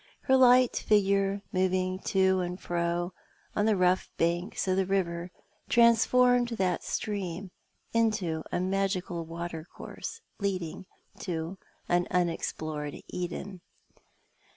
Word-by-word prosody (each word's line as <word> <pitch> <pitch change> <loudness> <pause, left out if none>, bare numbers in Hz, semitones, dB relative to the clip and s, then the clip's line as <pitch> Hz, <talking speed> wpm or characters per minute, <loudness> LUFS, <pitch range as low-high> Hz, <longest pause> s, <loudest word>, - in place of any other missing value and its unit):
Her 265 - +3
light 255 -1 +6
figure 200 -1 +2
moving 185 0 +1
to 190 -1 +3
and 180 0 -3
fro 175 +1 -1 0.4
ou 205 - +2
the 215 0 +3
rough 180 0 +2
banks 175 +4 0
of 185 - +2
the 190 - +2
river 175 -3 -1 0.4
transformed 245 +1 +5
that 190 -7 0
stream 195 -3 -3 0.4
into 215 -8 +1
a - - 0
magical 185 -2 -1
watercourse 170 - -7 0.2
lead 195 -3 0
ing 165 +3 -7 0.3
to 175 0 -4 0.3
an 175 0 +2
unexplored 155 -4 -2
Eden. 180 +1 -5
185 Hz, 110 wpm, -29 LUFS, 175-200 Hz, 0.4 s, light